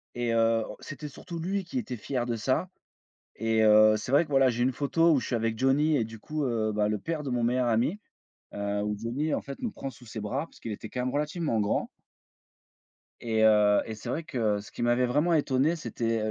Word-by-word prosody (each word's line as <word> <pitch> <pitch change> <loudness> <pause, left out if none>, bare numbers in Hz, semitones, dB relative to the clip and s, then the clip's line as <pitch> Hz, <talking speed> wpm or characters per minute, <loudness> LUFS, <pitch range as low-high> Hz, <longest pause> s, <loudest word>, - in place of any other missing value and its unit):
Et 120 -1 -1
heu, 115 0 +3 0.2
c'était 150 +1 -7
surtout 165 +4 -8
lui 190 +4 -2
qui 255 +9 -3
était 170 - -5
fier 120 +3 -2
de 120 -1 -1
ça 130 - 0 0.7
et 115 0 +2
heu, 110 0 +6
c'est 120 - -5
vrai 145 +4 +5
que 150 - -16
voilà, 135 -1 +5
j'ai 120 -1 0
une 130 +2 +2
photo 165 +6 +2
où 140 - +3
je - - -5
suis - - -2
avec 115 -1 -1
Johnny 145 +4 +3
et 115 - +1
du 110 0 -9
coup, 150 +7 -4
heu, 110 -3 0
bah, 105 0 +1
le 105 0 0
père 165 +5 -3
de 140 - -5
mon 120 -1 0
meilleur 125 +1 +1
ami, 120 - +1 0.5
heu, 100 0 -2
où 105 0 -1
Johnny 130 +8 -2
en - - -1
fait 140 0 -8
nous 240 - -1
prend 135 - -6
sous 125 0 -16
ses 110 0 -6
bras, 130 +9 -2
parce - - -20
qu'il 115 - -6
était 105 +1 -7
quand 125 - -3
même 125 - -1
relativement 150 -3 -1
grand 105 - 0 1.4
et 110 -2 +1
heu 105 -1 +5
et 110 - -5
c'est 110 - -8
vrai 165 - -2
que 110 -8 0
ce 105 +1 -12
qui - - -7
m'avait 120 +1 +3
vraiment 150 +7 +2
étonné, 145 +1 +2
c'était, 115 -6 -2
120 Hz, 235 wpm, -28 LUFS, 110-145 Hz, 1.4 s, heu